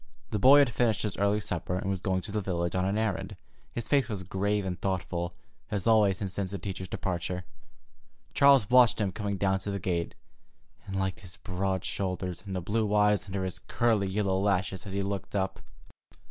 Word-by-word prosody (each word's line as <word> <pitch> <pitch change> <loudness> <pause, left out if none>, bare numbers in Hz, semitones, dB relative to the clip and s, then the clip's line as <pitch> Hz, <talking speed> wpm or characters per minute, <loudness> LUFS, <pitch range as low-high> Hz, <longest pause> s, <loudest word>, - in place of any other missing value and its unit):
The 105 - 0
boy 135 +7 +8
had 140 -4 +5
finished 115 -3 +1
his 105 -3 -2
early 100 +1 +2
supper, 90 -3 -2
and 95 - -3
was 95 -2 -1
going 95 -1 0
to 100 - -7
the 105 0 -1
village 85 -3 -1
on 95 0 +1
an 100 +2 0
errand. 110 -4 -1 0.4
His 120 -2 -5
face 135 -4 +2
was 100 -4 -4
grave 100 +2 -1
and 90 -2 -4
thoughtful, 90 -2 -2 0.3
as 100 -3 -2
always 105 -4 +4
since 95 -1 -3
the 100 - -4
teacher's 95 0 -5
departure. 90 0 -3 0.9
Charles 140 -6 +6
watched 125 -2 +6
him 100 -3 0
coming 100 -1 -3
down 95 0 +1
to 100 - -5
the 100 - -1
gate, 85 -3 -2 0.7
and 95 - -4
liked 95 -1 -1
his 90 -2 -10
broad 95 -1 -2
shoulders, 90 -2 -3
and 95 - -4
the 90 - -2
blue 105 +3 0
eyes 105 0 +3
under 95 0 -3
his 90 -1 -4
curly 110 -2 +1
yellow 95 -1 0
lashes 95 -1 0
as 95 - -6
he 100 0 0
looked 100 +1 -4
up. 95 -1 -1
95 Hz, 200 wpm, -29 LUFS, 95-105 Hz, 0.9 s, boy